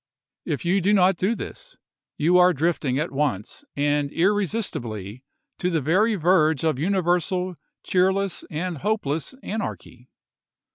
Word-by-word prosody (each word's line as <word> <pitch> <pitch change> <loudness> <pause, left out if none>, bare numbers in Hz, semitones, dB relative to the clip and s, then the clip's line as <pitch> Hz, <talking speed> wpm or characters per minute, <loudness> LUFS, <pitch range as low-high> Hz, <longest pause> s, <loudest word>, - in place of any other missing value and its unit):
If 155 0 -3
you 190 +3 +2
do 200 +4 +2
not 190 -1 +4
do 200 +7 +1
this, - - -9 0.4
you 175 +4 +4
are 180 0 +6
drifting 145 -4 0
at 155 +4 -2
once 135 - -2
and 145 0 0
irresistibly 165 - -1 0.4
to 180 - 0
the 165 -3 +1
very 190 - +2
verge 160 -4 +3
of 155 -5 +1
universal, 180 +1 0 0.3
cheerless, 190 +1 +1
and 165 0 -3
hopeless 165 -7 -1
seward, 260 - -13
anarchy. 130 - -6
175 Hz, 135 wpm, -24 LUFS, 145-195 Hz, 0.4 s, are